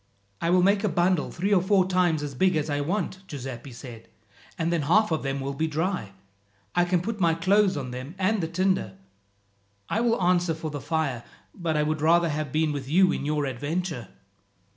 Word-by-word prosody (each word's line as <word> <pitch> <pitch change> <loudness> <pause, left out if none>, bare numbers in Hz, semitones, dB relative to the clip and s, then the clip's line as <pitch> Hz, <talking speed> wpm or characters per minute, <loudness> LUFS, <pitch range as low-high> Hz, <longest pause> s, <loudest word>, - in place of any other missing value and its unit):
"I 170 - 0
will 180 0 +4
make 200 +2 +3
a 210 - +2
bundle 175 -1 +1
three 195 +4 -1
or 185 - +5
four 190 0 +3
times 180 -5 +2
as 145 -1 -4
big 185 +7 +2
as 155 -1 -1
I 145 0 0
want," 185 +4 -2
Giuseppi 135 -3 -7
said, 115 -2 -11 0.5
"and 165 +1 0
then 170 - +1
half 180 +8 +3
of 160 - 0
them 135 0 -2
will 135 +1 -3
be 160 +4 -1
dry. 160 - -2 0.6
I 175 - +3
can 175 -1 +1
put 215 +2 -3
my 165 -3 +3
clothes 190 +2 +3
on 130 -3 -4
them 130 +7 -7
and 195 +2 +1
the 165 - -1
tinder. 170 - 0 0.9
I 225 - 0
will 235 -1 +2
answer 175 -2 +2
for 160 -1 -5
the 145 -2 -5
fire, 150 -7 -1 0.3
but 165 -5 -2
I 150 - +2
would 155 0 -1
rather 170 +2 +4
have 150 -2 -3
been 155 +1 +1
with 140 -2 -5
you 185 +3 +5
in 140 - -3
your 150 -1 0
adventure." 145 - -3
165 Hz, 205 wpm, -26 LUFS, 145-185 Hz, 0.9 s, or